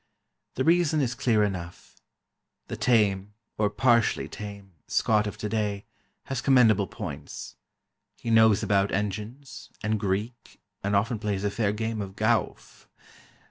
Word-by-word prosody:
The 130 - 0
reason 165 -1 +3
is 130 -3 0
clear 115 -3 +2
enough: 90 -4 -5 0.7
the - - -3
tame, 105 -4 +1 0.2
or 105 -1 +3
partially 120 0 +2
tame, 100 -2 -9 0.2
Scot 105 -1 +2
of 105 - -6
today, 105 -1 -2 0.4
has 135 -3 -3
commendable 115 -7 +4
points; - - -7 0.6
he 115 - -4
knows 110 -2 +5
about 100 -1 +2
engines, 105 +7 -4
and 105 0 0
Greek, 105 +4 -3 0.2
and 100 +1 0
often 110 +3 +1
plays 105 -2 -2
a 105 - 0
fair 105 -1 0
game 110 +1 -3
of 95 -1 -7
gowf. 110 +2 -1
105 Hz, 135 wpm, -26 LUFS, 100-115 Hz, 0.7 s, knows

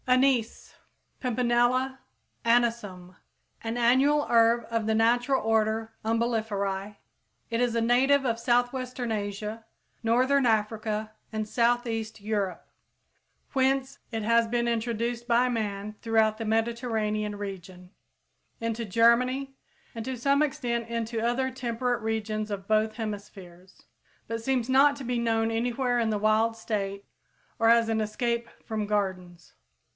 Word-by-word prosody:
=Anise= 255 -2 +2 0.5
(Pimpinella 250 +2 +1 0.4
Anisum, 230 -6 +1
Linn.), 185 - -22 0.5
an 225 +1 -3
annual 265 +5 +3
herb 230 0 +4
of 230 -1 -1
the 220 0 +1
natural 245 +4 +2
order 220 0 0
Umbelliferæ. 215 -3 -1 0.5
It 230 +1 0
is 240 -2 +1
a 230 - +2
native 265 +4 +3
of 230 -2 0
southwestern 245 0 0
Asia, 210 +1 -4 0.4
northern 255 +4 +3
Africa 215 0 -1 0.2
and 215 -1 -3
south 240 +2 +2
eastern 225 -2 -5
Europe, 205 -4 -2 0.9
whence 265 0 +1
it 225 -2 -3
has 230 +1 +3
been 235 +1 0
introduced 235 +1 -2
by 240 +1 +3
man 215 -3 -3
throughout 220 -1 +2
the 225 - -3
Mediterranean 220 -2 -1
region, 185 -2 -8 0.7
into 230 0 -2
Germany, 250 +6 +2 0.4
and 230 - -5
to 260 +1 -4
some 280 +4 +2
extent 245 -6 -1
into 230 -1 -2
other 250 +3 0
temperate 245 -1 -2
regions 215 -1 -2
of 200 -1 -5
both 215 0 +2
hemispheres, 195 -4 -8 0.4
but 230 0 -3
seems 255 -2 0
not 275 +2 +5
to 280 - -8
be 245 -1 -1
known 225 -1 +1
anywhere 245 +2 0
in 225 -1 +1
the 210 -1 0
wild 220 +2 +2
state 200 -3 -3 0.5
or 225 - +4
as 230 0 +5
an 220 -1 0
escape 235 +2 -2 0.2
from 215 -2 -3
gardens. 185 -5 -3
230 Hz, 130 wpm, -27 LUFS, 215-245 Hz, 0.9 s, not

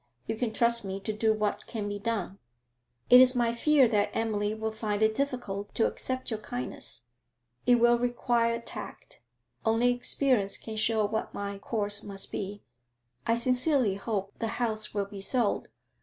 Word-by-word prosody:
You 220 - -2
can 225 0 -1
trust 235 +1 +3
me 195 0 -4
to 215 +2 -2
do 220 +1 +2
what 210 -1 -1
can 215 -3 -4
be 205 0 -4
done.' 200 -3 -3 0.7
'It 250 +1 +11
is 255 0 +6
my 235 -1 +2
fear 280 +2 +4
that 210 -3 +2
Emily 210 -2 0
will 220 0 -3
find 215 -1 -1
it 220 0 +3
difficult 220 -7 -3
to 225 - +3
accept 255 -1 -2
your 220 - -2
kindness.' 125 - -5 0.6
'It 245 - +7
will 240 0 +4
require 240 -1 +1
tact. - - -9 0.4
Only 225 +2 +3
experience 245 -4 +1
can 220 - -7
show 220 0 +2
what 220 +2 -3
my 200 0 -4
course 205 -1 0
must 195 -1 -6
be.' 205 +1 -5 0.6
'I 230 - +3
sincerely 255 -1 +2
hope 200 -1 -3
the 230 - -1
house 220 -3 -1
will 200 -1 0
be 200 -1 -9
sold. 230 0 0
220 Hz, 170 wpm, -29 LUFS, 205-240 Hz, 0.7 s, It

